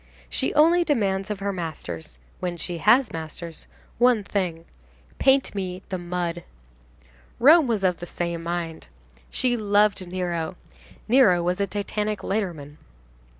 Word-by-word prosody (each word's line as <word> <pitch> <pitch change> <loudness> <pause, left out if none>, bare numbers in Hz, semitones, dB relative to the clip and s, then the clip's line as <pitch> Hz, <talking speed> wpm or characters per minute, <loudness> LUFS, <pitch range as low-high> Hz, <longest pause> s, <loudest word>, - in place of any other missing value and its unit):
She - - +1
only 335 +4 +5
demands 200 - 0
of 205 -2 -4
her 200 0 -1
masters—when 145 - -6
she 170 0 -4
has 235 +6 +4
masters—one 170 +8 -2
thing: 180 -5 -2 0.5
"Paint 270 0 +3
me 185 -2 -4
the 185 - -3
mud." 175 -1 -3 1.0
Rome 305 +3 +7
was 220 -4 0
of 180 -2 +2
the 175 - -8
same 170 -1 -3
mind. 170 -1 -4 0.4
She 250 -1 +1
loved 205 -4 +2
Nero. 175 -2 -2 0.5
Nero 215 -8 +5
was 180 +3 0
a 200 - +1
titanic 210 0 -3
lighterman. 170 -8 -3
185 Hz, 125 wpm, -24 LUFS, 170-210 Hz, 1.0 s, Rome